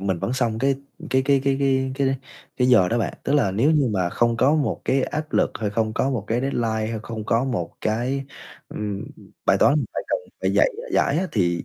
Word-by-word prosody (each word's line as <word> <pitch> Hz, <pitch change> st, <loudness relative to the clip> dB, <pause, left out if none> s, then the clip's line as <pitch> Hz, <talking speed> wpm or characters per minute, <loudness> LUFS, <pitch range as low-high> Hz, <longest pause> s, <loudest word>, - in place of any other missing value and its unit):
mình 95 Hz, -2 st, -1 dB
vẫn 120 Hz, -, -2 dB
xong 120 Hz, -4 st, 0 dB
cái 135 Hz, +3 st, +2 dB, 0.4 s
cái 130 Hz, 0 st, +3 dB
cái 140 Hz, 0 st, +3 dB
cái 135 Hz, -1 st, +2 dB
cái 130 Hz, -1 st, +1 dB
cái 135 Hz, -1 st, +1 dB, 0.4 s
cái 125 Hz, -1 st, +2 dB
giờ 95 Hz, -8 st, +5 dB
đó 120 Hz, -, 0 dB
bạn. 115 Hz, -, -2 dB
Tức 140 Hz, -, 0 dB
là 140 Hz, -9 st, +3 dB
nếu 115 Hz, +10 st, +2 dB
như 150 Hz, -5 st, +3 dB
mà 90 Hz, -3 st, +1 dB
không 120 Hz, +3 st, +1 dB
có 135 Hz, +5 st, +4 dB
một 150 Hz, -3 st, 0 dB
cái 135 Hz, 0 st, +2 dB
áp 155 Hz, +2 st, -4 dB
lực, -, -, +2 dB
hay 105 Hz, -2 st, -1 dB
không 110 Hz, +1 st, 0 dB
có 130 Hz, -, 0 dB
một 120 Hz, -7 st, -2 dB
cái 115 Hz, +3 st, 0 dB
deadline, 115 Hz, -5 st, -1 dB
hay 115 Hz, -, -3 dB
không 110 Hz, -2 st, -6 dB
có 115 Hz, +3 st, +1 dB
một 110 Hz, -11 st, -2 dB
cái, 125 Hz, +5 st, -1 dB, 0.4 s
ừm, 105 Hz, -2 st, -4 dB, 0.4 s
bài -, -, +4 dB
toán 140 Hz, -, +5 dB
mình 150 Hz, -, +1 dB
phải -, -, -2 dB
cần -, -, +1 dB, 0.2 s
phải -, -, 0 dB
dạy -, -, +5 dB, 0.2 s
giải 140 Hz, +3 st, +2 dB
á, 185 Hz, -, 0 dB
thì 85 Hz, -5 st, 0 dB
120 Hz, 235 wpm, -23 LUFS, 110-135 Hz, 0.4 s, giờ